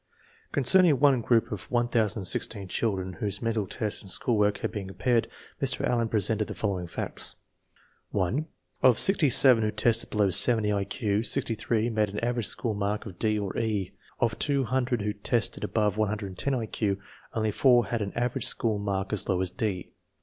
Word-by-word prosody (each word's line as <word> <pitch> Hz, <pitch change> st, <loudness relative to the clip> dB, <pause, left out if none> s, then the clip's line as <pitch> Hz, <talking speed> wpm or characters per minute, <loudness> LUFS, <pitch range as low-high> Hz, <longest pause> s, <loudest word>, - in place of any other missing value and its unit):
Concerning 145 Hz, +2 st, +4 dB
one 135 Hz, -3 st, +4 dB
group 115 Hz, 0 st, +1 dB
of 105 Hz, -4 st, -6 dB
1016 110 Hz, -4 st, -1 dB
children 95 Hz, -5 st, -2 dB
whose 100 Hz, -2 st, -1 dB
men 115 Hz, 0 st, -1 dB
tal 105 Hz, -3 st, -2 dB
test 105 Hz, +1 st, -2 dB
and 95 Hz, -, -9 dB
school 120 Hz, +5 st, 0 dB
work 105 Hz, -1 st, +2 dB
had -, -, -2 dB
been 100 Hz, -3 st, -5 dB
compared, 115 Hz, +4 st, 0 dB, 0.3 s
Mr. 130 Hz, -2 st, 0 dB
Allen 115 Hz, -2 st, 0 dB
presents 110 Hz, 0 st, +1 dB
the -, -, -7 dB
following 95 Hz, -4 st, -2 dB
facts: -, -, -1 dB, 0.7 s
1. 110 Hz, -, -1 dB, 0.3 s
Of 125 Hz, -4 st, +5 dB
sixty 185 Hz, -7 st, +4 dB
seven 125 Hz, -2 st, +5 dB
who 110 Hz, -, +1 dB
tested 110 Hz, +2 st, +1 dB
below 105 Hz, -3 st, +1 dB
70 105 Hz, +2 st, +4 dB
I 100 Hz, -1 st, -1 dB
Q, 105 Hz, 0 st, -1 dB
sixty 120 Hz, 0 st, 0 dB
three 115 Hz, +1 st, -1 dB
made 110 Hz, -2 st, +1 dB
an 105 Hz, +1 st, -4 dB
average 120 Hz, -2 st, -1 dB
school 115 Hz, -3 st, -1 dB
mark 100 Hz, +1 st, -2 dB
of 95 Hz, -5 st, -10 dB
D 110 Hz, -1 st, +1 dB
or 100 Hz, -2 st, -4 dB
E. 105 Hz, -5 st, -2 dB, 0.3 s
Of 115 Hz, -2 st, 0 dB
two 140 Hz, -2 st, +1 dB
hun 130 Hz, +2 st, 0 dB
dred 120 Hz, -3 st, -1 dB
who 105 Hz, 0 st, -1 dB
tested 105 Hz, +2 st, -1 dB
above 105 Hz, -1 st, 0 dB
110 110 Hz, +4 st, -2 dB
1 115 Hz, -2 st, -3 dB
Q, 100 Hz, -3 st, -1 dB, 0.4 s
only 110 Hz, -1 st, 0 dB
four 120 Hz, 0 st, +4 dB
had 120 Hz, -2 st, -3 dB
an 100 Hz, -1 st, -3 dB
average 125 Hz, +1 st, 0 dB
school 110 Hz, -3 st, 0 dB
mark 100 Hz, 0 st, -3 dB
as 105 Hz, -, 0 dB
low 95 Hz, -, +1 dB
as 95 Hz, -1 st, -1 dB
D. 95 Hz, -4 st, -3 dB
110 Hz, 190 wpm, -27 LUFS, 100-120 Hz, 0.7 s, Of